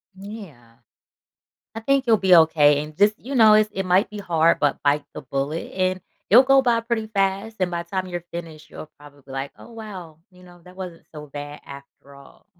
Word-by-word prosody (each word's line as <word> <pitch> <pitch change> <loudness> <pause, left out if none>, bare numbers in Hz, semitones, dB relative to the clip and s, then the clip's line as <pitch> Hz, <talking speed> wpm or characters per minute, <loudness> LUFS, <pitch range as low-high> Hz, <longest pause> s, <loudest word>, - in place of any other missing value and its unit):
Yeah. 190 - -12 1.0
I - - -4
think 275 +3 +1
you'll 225 - +5
be 185 -2 +5
okay 150 -3 +4
and 150 0 -12
just, 205 +1 +4
you 270 +3 -6
know, 220 -3 +7
it's 215 0 +4
it 190 0 -3
might 185 +4 +2
be 210 - -9
hard, 170 -4 +1
but 145 - 0
bite 145 0 +2
the - - -7
bullet, 140 +5 -4
and 185 0 -1 0.3
it'll 240 +6 +8
go 270 0 +5
by 240 -3 +2
pretty 230 -1 -3
fast 195 +1 -2
and 185 -1 0
by 170 0 -3
time 185 +2 -4
you're 175 -2 -6
finished, 160 -2 -8
you'll 155 - -10
probably 145 -1 -16
be 135 - -13
like, 135 +1 -5
"Oh, - - -14
wow," 195 -8 -10
you 180 0 -20
know, 175 -1 -17
"That 180 0 -15
wasn't 180 -3 -9
so 150 -1 -9
bad 145 +1 -9
after 140 0 -14
all." 140 0 -18
180 Hz, 210 wpm, -22 LUFS, 150-210 Hz, 1.0 s, it'll